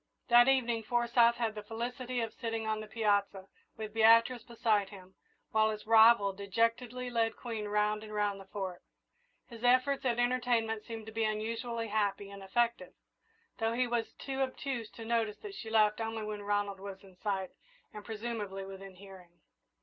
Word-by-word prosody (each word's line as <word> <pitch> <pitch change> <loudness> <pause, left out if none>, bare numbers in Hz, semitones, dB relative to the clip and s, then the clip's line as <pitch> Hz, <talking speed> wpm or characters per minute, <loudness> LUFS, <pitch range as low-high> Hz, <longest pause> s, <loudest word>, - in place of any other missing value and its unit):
That 240 +1 +7
evening 240 -4 +2
Forsyth 235 +1 +3
had 230 -2 -1
the 210 - -6
felicity 245 +3 -4
of 225 -1 -3
sitting 225 -2 -3
on 215 0 -1
the 215 - -7
piazza, 205 -3 0 0.3
with 215 -1 -6
Beatrice 230 +2 +5
beside 225 -4 0
him, 190 -2 -13 0.4
while 220 0 +3
his 215 -1 -5
rival 220 -2 +6
dejectedly 230 +5 -1
led 225 -1 +1
Queen 225 -3 -5
round 210 +1 +1
and 215 - -10
round 205 -1 -1
the - - -12
Fort. 190 -3 -5 0.6
His 230 -1 -12
efforts 255 +3 +3
at 240 -3 +1
entertainment 245 -3 +1
seemed 225 -2 -7
to 220 - -8
be 225 +1 -1
unusually 230 +2 -2
happy 200 -1 -1
and 200 0 -10
effective, 210 -1 0 0.7
though 225 0 +1
he 250 +2 +1
was 235 -2 -1
too 270 0 -5
obtuse 260 -3 -3
to 225 - -10
notice 225 -2 0
that 415 -2 -7
she 225 - -7
laughed 215 0 +3
only 225 0 -3
when 210 -1 -5
Ronald 205 -1 -1
was 195 0 -8
in 190 -2 -16
sight 190 -1 -3 0.4
and, 210 - -8
presumably, 210 -3 -5
within 195 0 -10
hearing. 190 -2 -13
220 Hz, 170 wpm, -32 LUFS, 205-235 Hz, 0.7 s, That